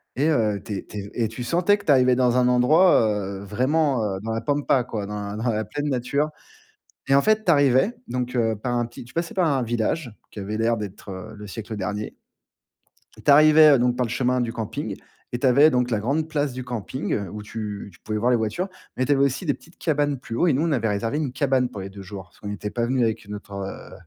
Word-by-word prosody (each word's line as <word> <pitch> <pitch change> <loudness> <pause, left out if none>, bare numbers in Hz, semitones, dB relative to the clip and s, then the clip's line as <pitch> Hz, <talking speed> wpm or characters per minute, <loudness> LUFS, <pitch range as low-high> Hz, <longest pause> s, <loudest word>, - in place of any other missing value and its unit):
et 145 +5 +2
heu, 110 -9 +1
tu 105 - -5
es - - -7
tu - - -9
es 100 +1 -8
et - - 0
tu 115 +2 -6
sentais 180 +9 +2
que - - -14
tu - - +4
arrivais 130 -2 +5
dans 125 -1 +2
un 125 - +4
endroit, 135 +9 +5
heu, 100 -2 -3
vraiment, 130 +4 +1
heu, 95 -2 -2
dans 110 +1 -4
la 115 - -2
pampa, 140 0 +1
quoi, 110 -4 -4
dans 105 0 -4
la - - -5
dans 115 +3 -1
la 110 -1 -1
pleine 145 +4 -3
nature. 140 +4 0 0.8
Et 135 - +4
en 140 - +6
fait, 215 0 +2
tu 175 - +5
arrivais 140 - +4
donc 125 0 -3
heu, 115 -2 +1
par 125 0 -2
un 120 0 +1
petit 120 +1 -10
tu 125 - -16
passais 170 +2 -2
par 180 -3 +2
un 135 -4 +1
village 120 +3 -1 0.2
qui - - -8
avait 105 +2 -4
l'air 115 +1 +2
d'être, 105 -1 -7
heu, 95 +3 -8
le 105 - -9
siècle 110 +2 -6
dernier. 105 +2 -4 1.1
Tu - - +5
arrivais, 155 +1 +8
heu - - +4
donc 125 0 +2
par 125 -1 +1
le - - -7
chemin 125 +1 +1
du 115 -1 -1
camping 110 -3 -4 0.4
et 120 - -2
tu 135 - +1
avais 140 +5 +6
donc 125 -1 +1
la 105 - +1
grande 145 +8 0
place 145 -3 -1
du 130 0 -6
camping 120 -2 -3
où 105 +4 -7
tu 105 -2 -6
tu 85 - -21
pouvais 110 0 -3
voir 120 +4 +2
les - - +5
voitures 115 - -2 0.3
mais 130 - +1
tu 145 - +2
avais 140 - +3
aussi 140 +6 -1
des 145 - +2
petites 165 - -19
cabanes 145 -3 0
plus 115 -2 -8
haut 175 - +3
et - - +4
nous, 135 +4 +1
on 165 - +1
avait 115 -5 +1
réservé 115 +7 -1
une 150 -4 -1
cabane 130 -2 +1
pour 105 - -8
les 95 - -7
2 100 0 -10
jours 95 0 -8
parce 85 - -26
qu'on 105 - -7
n'était 105 0 -4
pas 120 -1 -1
venu 125 -1 +1
avec 110 -1 -2
notre, 105 0 -8
heu, 100 0 -7
125 Hz, 260 wpm, -24 LUFS, 105-140 Hz, 1.1 s, arrivais